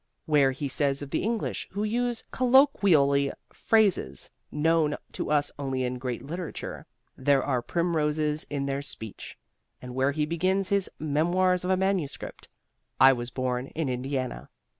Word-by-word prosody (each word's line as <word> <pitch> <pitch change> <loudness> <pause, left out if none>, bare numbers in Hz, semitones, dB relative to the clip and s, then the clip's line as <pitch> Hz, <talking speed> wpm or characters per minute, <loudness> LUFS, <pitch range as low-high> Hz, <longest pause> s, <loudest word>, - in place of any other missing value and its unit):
Where 145 -3 +4
he 135 +2 -3
says 140 0 0
of 140 - -9
the - - 0
English 225 +1 -2
who 205 +2 -2
use 240 +2 -1
colloquially 195 - +4 0.2
phrases 200 - +1 0.2
known 155 -1 +2
to - - -4
us 145 -1 +2
only 135 -2 -2
in 125 0 -2
great 125 -1 -4
literature 170 +3 -6 0.3
"There 135 0 +2
are 130 -4 0
primroses 155 -2 0
in 140 -1 -3
their 140 0 -2
speech." 110 -6 -7 0.4
And 125 0 -8
where 130 +2 +2
he 150 0 0
begins 185 +4 0
his 200 -2 +1
"Memoirs 175 +5 +1
of 180 - -2
a 185 - +3
Manuscript," 190 -6 -2 0.5
"I 135 +1 +8
was 120 -1 -4
born 125 0 -2
in 155 -3 -1
Indiana." 130 0 -3
150 Hz, 150 wpm, -27 LUFS, 135-180 Hz, 0.5 s, I